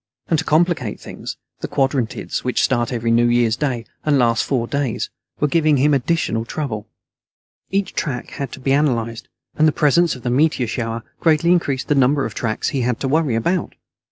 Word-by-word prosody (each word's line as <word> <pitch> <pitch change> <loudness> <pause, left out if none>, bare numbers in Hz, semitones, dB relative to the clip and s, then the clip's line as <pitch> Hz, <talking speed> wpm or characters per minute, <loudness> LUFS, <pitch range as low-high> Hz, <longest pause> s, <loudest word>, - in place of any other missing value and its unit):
And 165 - +3
to 160 - -3
complicate 155 - +1
things, - - -8 0.2
the - - -4
Quadrantids, 135 -4 -1
which 125 - +1
start 120 -3 +1
every 115 -1 -1
New 120 +1 +4
Year's 120 -1 +3
Day 125 -4 -2 0.2
and 150 -2 +3
last 115 -3 +3
four 125 -4 0
days, 140 -3 -2 0.3
were 150 - +2
giving 155 -1 +3
him 145 +3 +3
additional 135 -4 0
trouble. 115 -4 -4 0.8
Each 195 0 -1
track 125 -5 -3
had 140 -4 -5
to - - -8
be 135 +1 +1
analyzed, 115 -6 0 0.3
and 155 - +5
the - - +4
presence 155 +3 +3
of 125 - -12
the 120 - -1
meteor 140 -1 +2
shower 115 0 -3 0.2
greatly 165 +1 +3
increased 140 -7 +1
the - - +3
number 140 0 +3
of 110 - -5
tracks 110 -2 -1
he 135 - -1
had 120 -1 0
to 135 - 0
worry 150 -3 +1
about. 170 +11 -1
135 Hz, 190 wpm, -20 LUFS, 120-150 Hz, 0.8 s, and